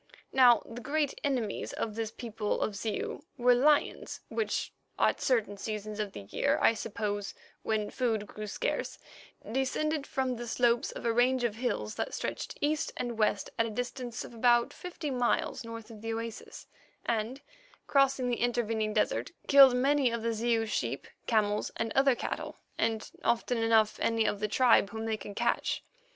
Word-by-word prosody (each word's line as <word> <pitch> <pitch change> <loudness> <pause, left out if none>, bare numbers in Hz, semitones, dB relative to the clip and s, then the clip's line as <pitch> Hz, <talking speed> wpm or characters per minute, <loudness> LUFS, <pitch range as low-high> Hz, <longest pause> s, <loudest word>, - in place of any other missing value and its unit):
Now 245 -4 +6
the 235 +1 -8
great 295 +1 0
enemies 255 -7 -1
of 220 - -3
this 225 0 -2
people 225 -2 -3
of 210 - -1
Zeu 420 - -3 0.2
were 245 0 +5
lions, 285 +4 +2
which 445 - -2 0.2
at - - +2
certain 220 -5 +1
seasons 215 0 -5
of 210 -2 -2
the - - -7
year, 275 - 0
I - - +5
suppose 205 -2 -3 0.3
when 215 -1 -1
food 225 -5 0
grew 215 +1 -7
scarce, - - -2 0.5
descended 280 +4 0
from 260 -2 -1
the 240 +1 -6
slopes 240 0 +2
of - - -8
a 230 - +2
range 250 +2 +3
of 225 -2 0
hills 245 +1 -2
that - - -3
stretched - - -4
east 300 +1 0
and 240 -2 -3
west 210 -2 +1
at 230 - +3
a - - -4
distance 245 +1 -4
of - - -11
about 240 0 +3
fifty 340 -5 -5
miles 245 0 0
north 230 0 -8
of 215 -2 -11
the 225 0 -3
oasis, 230 0 -7 0.4
and, 235 +4 -1 0.4
crossing 275 -2 +3
the 240 -1 -1
intervening 225 -3 0
desert, 215 - +1 0.2
killed 275 -2 +8
many 270 +1 +3
of 230 -1 -3
the 230 0 0
Zeu 225 0 +1
sheep, 215 - -2 0.2
camels, 210 -2 +1
and 225 -1 -2
other 270 -1 +4
cattle, - - -4 0.2
and 225 -1 -1
often 235 0 +1
enough 225 -1 +3
any 230 -1 +2
of 205 - 0
the 210 - 0
tribe 230 -2 +4
whom 220 +1 -5
they 220 -1 0
could 205 -1 -9
catch. 235 +2 0
235 Hz, 170 wpm, -30 LUFS, 220-255 Hz, 0.5 s, killed